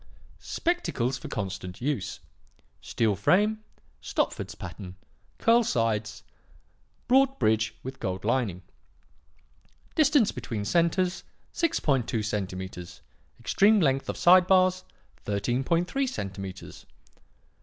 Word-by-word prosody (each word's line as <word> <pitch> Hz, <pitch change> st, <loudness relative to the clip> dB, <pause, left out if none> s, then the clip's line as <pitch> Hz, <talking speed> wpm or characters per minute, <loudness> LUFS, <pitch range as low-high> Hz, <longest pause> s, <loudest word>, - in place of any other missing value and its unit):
"'Spectacles 135 Hz, -, -1 dB
for -, -, -8 dB
constant 95 Hz, -3 st, -5 dB
use. 135 Hz, -6 st, -3 dB, 0.6 s
Steel 110 Hz, -3 st, 0 dB
frame, 210 Hz, -, +2 dB, 0.4 s
Stopford's -, -, -2 dB
pattern, 90 Hz, +1 st, -9 dB, 0.4 s
curl 235 Hz, +1 st, +4 dB
sides, 110 Hz, -, -1 dB, 0.8 s
broad 270 Hz, +1 st, +4 dB
bridge 110 Hz, 0 st, +1 dB
with 130 Hz, +1 st, -7 dB
gold 95 Hz, +1 st, -4 dB
lining. 110 Hz, -7 st, 0 dB, 1.3 s
Distance 290 Hz, -7 st, +4 dB
between 105 Hz, -3 st, -5 dB
centres, 175 Hz, -, +1 dB, 0.3 s
6.2 135 Hz, -, 0 dB
centimetres; 95 Hz, -4 st, -5 dB, 0.4 s
extreme 210 Hz, +2 st, +4 dB
length 135 Hz, -5 st, +1 dB
of -, -, -3 dB
side 180 Hz, +1 st, +6 dB
bars, 185 Hz, -1 st, +3 dB, 0.4 s
13.3 150 Hz, -, 0 dB
centimetres. 95 Hz, -, -7 dB
125 Hz, 90 wpm, -27 LUFS, -, 1.3 s, side